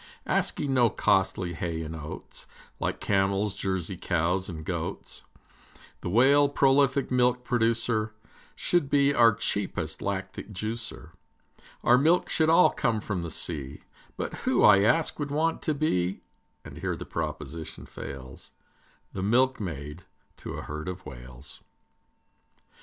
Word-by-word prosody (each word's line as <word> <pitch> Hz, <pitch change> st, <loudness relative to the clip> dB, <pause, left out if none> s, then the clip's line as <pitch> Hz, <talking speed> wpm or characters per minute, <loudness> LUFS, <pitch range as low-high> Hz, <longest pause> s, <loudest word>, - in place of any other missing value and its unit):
Asking 140 Hz, -2 st, 0 dB
no 120 Hz, -3 st, +5 dB
costly 95 Hz, -2 st, +1 dB
hay 80 Hz, -1 st, -3 dB
and 80 Hz, +1 st, -6 dB
oats, 80 Hz, -1 st, -8 dB, 0.3 s
Like -, -, -2 dB
camels, 100 Hz, +1 st, +1 dB
Jersey 95 Hz, -2 st, -3 dB
cows, 90 Hz, +2 st, 0 dB
and 80 Hz, -3 st, -7 dB
goats, -, -, -4 dB, 0.8 s
The -, -, -4 dB
Whale, 140 Hz, +7 st, +5 dB
prolific 140 Hz, -1 st, +3 dB
milk 125 Hz, 0 st, +2 dB
producer, 115 Hz, -2 st, +1 dB, 0.4 s
Should 175 Hz, -6 st, +1 dB
be 140 Hz, 0 st, +4 dB
our 115 Hz, -5 st, +5 dB
cheapest 100 Hz, -3 st, -2 dB
lactic 105 Hz, -, -4 dB
juicer. 110 Hz, +3 st, -4 dB, 0.7 s
Our 125 Hz, +1 st, +6 dB
milk 165 Hz, +5 st, +3 dB
should 160 Hz, -1 st, +3 dB
all 165 Hz, +2 st, +6 dB
come 115 Hz, -2 st, 0 dB
from 100 Hz, -4 st, -3 dB
the 85 Hz, -, -4 dB
sea, 75 Hz, -4 st, -4 dB, 0.3 s
But -, -, -3 dB
who, -, -, +1 dB
I 100 Hz, -, +8 dB
ask, 155 Hz, +12 st, +2 dB
would 145 Hz, -1 st, -2 dB
want 160 Hz, +3 st, 0 dB
to 155 Hz, -, -1 dB
be, 95 Hz, -, 0 dB, 0.4 s
And -, -, -9 dB
here -, -, -2 dB
the -, -, -7 dB
proposition 80 Hz, -1 st, -5 dB
fails, 65 Hz, -2 st, -9 dB, 0.6 s
The 95 Hz, -, -4 dB
milkmaid 95 Hz, -, 0 dB, 0.3 s
to -, -, -7 dB
a -, -, -6 dB
herd 75 Hz, +2 st, -6 dB
of 90 Hz, 0 st, -6 dB
Whales? 60 Hz, +3 st, -10 dB
105 Hz, 135 wpm, -27 LUFS, 85-130 Hz, 0.8 s, I